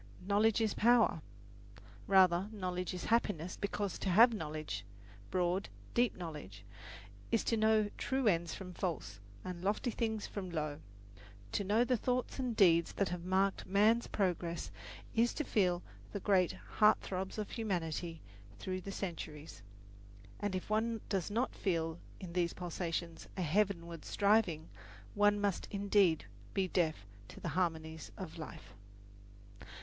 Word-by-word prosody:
"Knowledge 210 +3 +3
is 220 -2 +2
power." 230 -7 +4 0.9
Rather, 190 0 +5
knowledge 180 -3 -3
is 180 -1 -5
happiness, 185 -7 +1
because 200 -2 -2
to 195 - -1
have 230 +6 +7
knowledge 155 - -4 0.5
broad, 180 +1 0 0.2
deep 240 0 +3
knowledge 150 - -7 0.7
is 230 -3 +3
to 230 - +1
know 220 -1 +4
true 265 -1 0
ends 170 -4 +2
from 180 -2 -8
false, 155 - -3 0.3
and 180 -1 -5
lofty 210 +5 0
things 220 -2 -1
from 190 -3 -5
low. 155 -3 -3 0.7
To 200 - 0
know 210 +5 +3
the 250 0 +2
thoughts 250 +4 -1
and 250 -3 -1
deeds 170 -5 +5
that 200 - 0
have 175 0 -4
marked 190 +1 +1
man's 215 +5 +4
progress 175 -4 -1 0.4
is 235 +1 +2
to 305 - -1
feel 180 -8 +1 0.3
the 205 - -2
great 190 -3 +3
heart 215 0 +3
throbs 190 +2 -4
of 210 -1 -3
humanity 170 -6 -2 0.4
through 185 - -3
the 195 - -6
centuries; 155 - -6 0.8
and 205 -2 -1
if 185 - -4
one 220 +1 0
does 195 -2 0
not 235 +5 0
feel 165 -3 -1 0.2
in 180 -3 -7
these 175 -1 +1
pulsations 170 -1 -4
a 185 - 0
heavenward 170 -2 0
striving, 200 -6 +2 0.5
one 205 0 +4
must 200 -3 0
indeed 200 - +3 0.3
be 195 -1 +2
deaf 160 - 0 0.2
to - - -11
the - - -3
harmonies 160 -3 -2
of - - -7
life. 100 - -9
185 Hz, 145 wpm, -34 LUFS, 170-210 Hz, 0.9 s, have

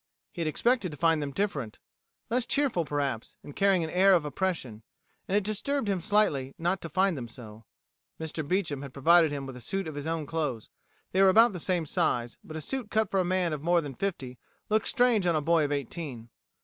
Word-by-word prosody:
He 175 - -6
had 160 - 0
expected 235 +5 +1
to 150 - -9
find 165 +1 +2
them 145 - -2
different; 140 - -3 0.5
less 245 0 +1
cheerful, 265 - +1
perhaps, 140 -5 -3
and 145 - -11
carrying 195 -3 +3
an 160 - -4
air 190 +2 +5
of 165 -4 +1
oppression. 145 - -3 0.5
And 195 - +2
it 205 - +1
disturbed 215 +5 -1
him 195 -3 0
slightly 155 -9 +1
not 175 +3 -1
to 165 - -6
find 190 +3 +2
them 125 -4 -5
so. 110 -2 -12 0.5
Mr. 160 0 -4
Beecham 160 -6 -1
had 140 -2 -8
provided 165 +3 +5
him 140 -1 -4
with 135 -1 -8
a 125 - -10
suit 195 - -3
of 155 - -5
his 145 +1 -5
own 165 -2 -2
clothes. 145 -8 -3 0.4
They 190 - +2
were 195 - +7
about 225 +3 +6
the 180 - -5
same 175 -1 +1
size, 120 -4 -1
but 155 - -8
a - - -5
suit 255 - -3
cut 220 -3 +1
for 195 - +2
a - - +3
man 180 -2 0
of 150 - -4
more 170 +2 +3
than 145 -4 -5
fifty 135 -9 -4 0.3
looks 215 +1 +2
strange 240 -7 +3
on 170 - +2
a - - +2
boy 165 0 +3
of 145 - -3
eighteen. 140 -4 -5
165 Hz, 225 wpm, -28 LUFS, 140-195 Hz, 0.5 s, were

